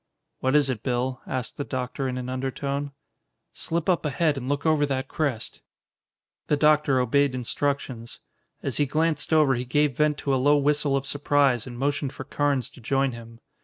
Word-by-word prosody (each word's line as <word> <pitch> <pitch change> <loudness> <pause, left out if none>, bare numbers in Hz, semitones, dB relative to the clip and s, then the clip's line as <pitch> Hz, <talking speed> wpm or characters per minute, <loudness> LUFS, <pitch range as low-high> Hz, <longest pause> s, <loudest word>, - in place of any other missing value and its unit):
"What 130 +2 +1
is 145 -3 +4
it, 115 -5 -4
Bill?" 125 0 -1
asked 130 -1 -4
the 145 - -2
doctor 130 0 -3
in 130 -1 -3
an 125 -1 -4
undertone. 140 +2 -3 0.6
"Slip 165 -1 -2
up 180 -3 +2
ahead 150 +1 +1
and 130 -1 -5
look 145 +1 -1
over 155 -2 +3
that 135 -1 -2
crest." 135 -8 -3 0.9
The 150 - +2
doctor 150 -3 +4
obeyed 135 +2 +2
instructions. 130 -1 -3 0.4
As - - -2
he 145 - +2
glanced 155 0 0
over 155 -4 +5
he 125 -1 -1
gave 140 +1 +1
vent 150 -1 +2
to 140 - -1
a 130 - +2
low 145 +2 +5
whistle 145 -1 +2
of 135 - -3
surprise 140 -3 +2
and 120 -1 -8
motioned 140 +1 -1
for - - -7
Carnes 140 -2 0
to - - -15
join 135 +3 +1
him. 115 0 -11
140 Hz, 185 wpm, -25 LUFS, 130-145 Hz, 0.9 s, over